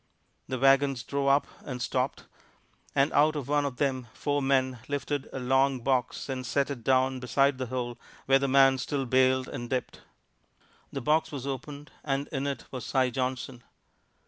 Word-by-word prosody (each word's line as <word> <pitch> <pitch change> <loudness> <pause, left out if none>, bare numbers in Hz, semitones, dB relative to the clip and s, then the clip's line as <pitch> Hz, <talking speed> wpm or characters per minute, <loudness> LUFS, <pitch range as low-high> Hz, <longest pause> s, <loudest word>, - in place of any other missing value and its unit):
The 130 - -2
wagons 135 -1 +3
drove 140 +3 -2
up 140 +1 +4 0.2
and 125 -3 -5
stopped. 125 +2 -2 0.7
And 140 +3 +3
out 155 +2 +4
of 145 -4 -4
one 145 0 +2
of 135 -3 -4
them 130 -4 -1
four 145 0 -1
men 130 -2 +1
lifted 145 -1 -3
a - - -5
long 135 0 +2
box 125 -1 0
and 130 -2 -3
set 140 +3 0
it 125 -5 -6
down 130 0 +2
beside 135 +2 +2
the 130 - -2
hole 120 -1 -4 0.3
where 135 0 +5
the 140 - 0
man 135 0 +5
still 135 +1 -2
bailed 130 +1 +3
and 120 0 -6
dipped. 130 -1 -3 0.9
The 135 - -4
box 155 +4 +2
was 140 -3 -5
opened 140 +2 -6
and 140 0 -1
in 140 -1 -2
it 140 -4 -4
was 130 -2 -5
Si 130 -2 +1
Johnson. 125 0 -3
135 Hz, 175 wpm, -28 LUFS, 130-140 Hz, 0.9 s, where